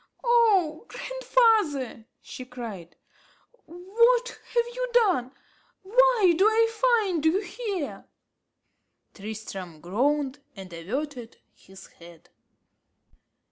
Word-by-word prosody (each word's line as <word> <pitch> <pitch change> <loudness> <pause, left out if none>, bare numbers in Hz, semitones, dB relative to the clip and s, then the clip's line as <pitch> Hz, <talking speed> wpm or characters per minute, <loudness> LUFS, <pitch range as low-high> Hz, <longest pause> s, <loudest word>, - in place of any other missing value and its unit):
"Oh 435 -8 +2
grandfather!" 435 - 0 0.2
she 255 - -9
cried, 230 -9 -9 0.7
"what 465 +9 +2
have 475 0 -2
you - - -3
done? 370 - +2 0.5
why 455 -3 +4
do 370 - +2
I 450 +1 +3 0.4
find 355 -6 -2
you 320 +4 +3
here?" 405 - -5 1.1
Tristram 195 -5 -8
groaned, 270 - -1 0.2
and 190 -3 -10
averted 245 - -5 0.2
his 190 0 -16
head. 170 -1 -17
315 Hz, 90 wpm, -26 LUFS, -, 1.1 s, why